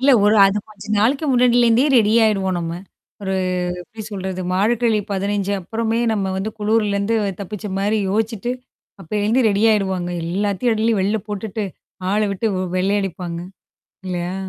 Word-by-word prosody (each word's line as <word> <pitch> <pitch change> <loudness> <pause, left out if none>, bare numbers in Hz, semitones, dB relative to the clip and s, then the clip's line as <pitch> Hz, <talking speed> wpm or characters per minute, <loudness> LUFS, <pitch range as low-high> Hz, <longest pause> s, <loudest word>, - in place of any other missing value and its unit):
இல்ல. 275 +2 +4
ஒரு 210 +1 +5
அது 195 +1 +1
கொஞ்ச 205 -2 -13
நாளைக்கு 270 +8 +2
முன்னாடியிலேருந்தே 245 0 +4
ரெடி 215 -2 +4
ஆயிடுவோம் 195 -4 +1
நம்ம. 165 -1 -3 0.5
ஒரு 190 -1 -1 0.5
எப்டி 225 +4 -10
சொல்றது 190 -2 -4
மார்கழி 220 +3 +2
15 200 0 -1
அப்புறமே 225 +4 -1
நம்ம 205 -3 0
வந்து 195 +3 -2
குளூர்லருந்து 210 0 +1 0.2
தப்பிச்ச 210 +1 -6
மாரி 210 +2 +1
யோசிச்சுட்டு, 225 +2 -1 0.5
அப்பேலிருந்து 210 +7 +1
ரெடியிடுவாங்க. 200 -4 +1 0.2
எல்லாத்தையும் 200 +6 0
அள்ளி 225 +2 +2
வெள்ல 205 +3 +1
போட்டுட்டு 210 +1 -3 0.5
ஆள 210 +2 +2
விட்டு 195 +3 -3
வெ 185 - -1
வெள்ளையடிப்பாங்க. 185 -3 -1 0.7
இல்லையா? 180 0 -3
205 Hz, 135 wpm, -20 LUFS, 190-225 Hz, 0.7 s, ஒரு